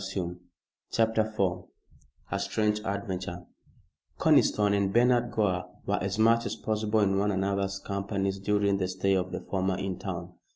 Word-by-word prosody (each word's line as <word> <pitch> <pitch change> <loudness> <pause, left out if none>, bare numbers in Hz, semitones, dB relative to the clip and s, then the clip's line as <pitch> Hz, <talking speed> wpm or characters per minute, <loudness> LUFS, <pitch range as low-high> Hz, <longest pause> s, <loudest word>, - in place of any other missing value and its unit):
CHAPTER 110 -1 +2
IV 90 -3 -1 0.7
A - - 0
STRANGE 105 -1 0
ADVENTURE 95 -3 -4 0.7
Conniston 105 -1 +4
and 100 -1 +1
Bernard 120 +2 +3
Gore 95 -6 0 0.2
were 100 - 0
as 100 +2 -2
much 115 +1 +4
as - - -3
possible 110 0 0
in 95 -1 +2
one 105 +1 +1
another's 95 0 -1
company 100 0 -2
during 100 0 +1
the 95 - 0
stay 95 +1 0
of 90 -1 0
the - - -4
former 95 -1 -1
in 95 -2 -3
town. 90 -2 -5
100 Hz, 150 wpm, -28 LUFS, 95-105 Hz, 0.7 s, Conniston